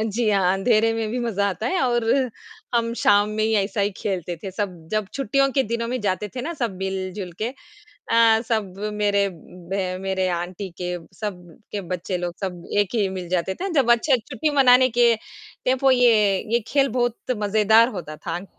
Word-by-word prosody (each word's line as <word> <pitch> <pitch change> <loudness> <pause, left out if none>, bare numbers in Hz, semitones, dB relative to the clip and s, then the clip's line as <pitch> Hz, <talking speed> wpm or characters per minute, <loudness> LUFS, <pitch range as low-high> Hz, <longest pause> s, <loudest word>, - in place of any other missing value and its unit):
जी 220 +1 0
हाँ, 190 -3 +3
अँधेरे 220 +3 +2
में 225 -1 -2
भी 250 - -2
मज़ा 205 -4 0
आता 195 +4 -3
है 370 +6 0
और 240 -2 +1 0.7
हम 230 0 +1
शाम 205 +1 +4
में 215 0 -1
ही 220 - +1
ऐसा 205 +2 -3
ही 200 +1 +1
खेलते 180 -3 -3
थे 195 - -5
सब, 180 -5 -5
जब 215 -2 0
छुट्टियों 275 +1 +1
के 270 - +3
दिनों 230 0 -3
में 250 0 -2
जाते 205 0 -1
थे - - -2
ना 335 - -3
सब 235 - -3
मिल-जुलके 190 +1 -4 0.6
अ, 230 -1 +5
सब 210 -5 -1 0.2
मेरे 200 -1 +2
ब 180 +2 -5
मेरे 190 -1 0
आंटी 175 +3 -4
के, 180 0 -2 0.2
सब 180 -6 -7
के 205 - -2
बच्चे 180 0 -4
लोग, 175 -1 -4
सब 180 -3 -4 0.2
एक 205 +1 +1
ही 210 -4 +2
मिल 185 -2 -6
जाते 180 +1 -1
थे 385 - -4
जब 275 - +4
बच्चे 240 +4 +4
छुट्टी 310 - -1
मनाने 255 -1 +6
के 235 -1 +6 0.5
टेंपो 260 +1 +3
ये 225 -6 +4 0.2
ये 235 - +3
खेल 275 -1 +2
बहुत 240 -1 +1 0.2
मज़ेदार 215 +2 +4
होता 155 -2 -7
था। 175 +4 -5
210 Hz, 185 wpm, -23 LUFS, 185-235 Hz, 0.7 s, मनाने